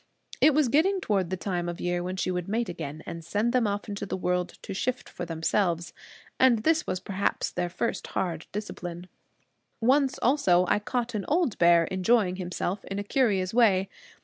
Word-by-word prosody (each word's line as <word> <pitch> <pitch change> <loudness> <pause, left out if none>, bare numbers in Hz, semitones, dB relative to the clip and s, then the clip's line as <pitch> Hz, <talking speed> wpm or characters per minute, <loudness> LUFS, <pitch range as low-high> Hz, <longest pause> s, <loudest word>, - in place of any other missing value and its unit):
It 305 - +6
was 300 -3 +4
getting 340 +10 +3
toward 195 - 0
the 185 - -2
time 175 0 -2
of 175 - -6
year 175 0 -1
when 180 +1 -3
she 185 0 -1
would 180 -1 -3
mate 225 +2 -1
again, 155 -3 -6
and 165 0 -7
send 215 +8 0
them 245 -4 +3
off 205 0 -3
into 205 -1 -5
the 195 - -3
world 180 0 -1
to - - -5
shift 250 +6 -2
for 175 - -6
themselves. 170 0 0 0.5
And 240 -4 +4
this 320 +2 +2
was 185 - -1
perhaps 195 +1 -1
their 180 -1 -2
first 205 +6 -3
hard 170 -3 -3
discipline. 180 -4 -6 0.7
Once 265 +3 +3
also 190 -10 +3
I - - +3
caught 240 +2 -2
an 205 -3 -3
old 315 - +1
bear 170 -1 +6
enjoying 185 +1 +1
himself 180 +1 -3
in 195 - -5
a 205 - -2
curious 205 -5 +1
way. 200 -5 +4
195 Hz, 190 wpm, -27 LUFS, 175-235 Hz, 0.7 s, It